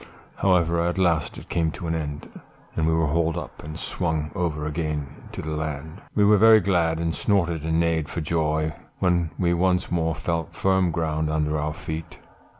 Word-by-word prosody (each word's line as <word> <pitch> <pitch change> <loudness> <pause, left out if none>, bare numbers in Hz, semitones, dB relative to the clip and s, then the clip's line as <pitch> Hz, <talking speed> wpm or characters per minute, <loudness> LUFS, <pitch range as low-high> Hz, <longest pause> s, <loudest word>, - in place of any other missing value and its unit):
"However, 85 -3 +3
at 85 +2 0
last 85 -5 +1
it - - -10
came 85 -2 +1
to - - -7
an 80 - -1
end, 75 -2 -4 0.5
and 80 -1 +1
we 80 - +3
were 80 -1 +2
hauled 80 +2 +1
up, - - -7
and 75 +2 -7
swung 80 -4 -2
over 80 -6 -2
again 75 -1 -2 0.3
to - - -6
the 80 - -4
land; 75 +3 -4
we 105 - +4
were 105 0 +6
very 110 +1 +8
glad, 85 -4 +1
and 85 0 -1
snorted 85 -6 +1
and 80 +1 +1
neighed 80 -3 +1
for - - -3
joy, 80 -1 0 0.2
when 85 -3 +2
we 85 -1 +2
once 90 0 +1
more 80 -2 +1
felt 80 -1 -3
firm 95 -2 +2
ground 80 -1 -1
under 75 0 0
our 75 +1 -2
feet. 80 +1 -6
80 Hz, 190 wpm, -25 LUFS, 80-85 Hz, 0.5 s, very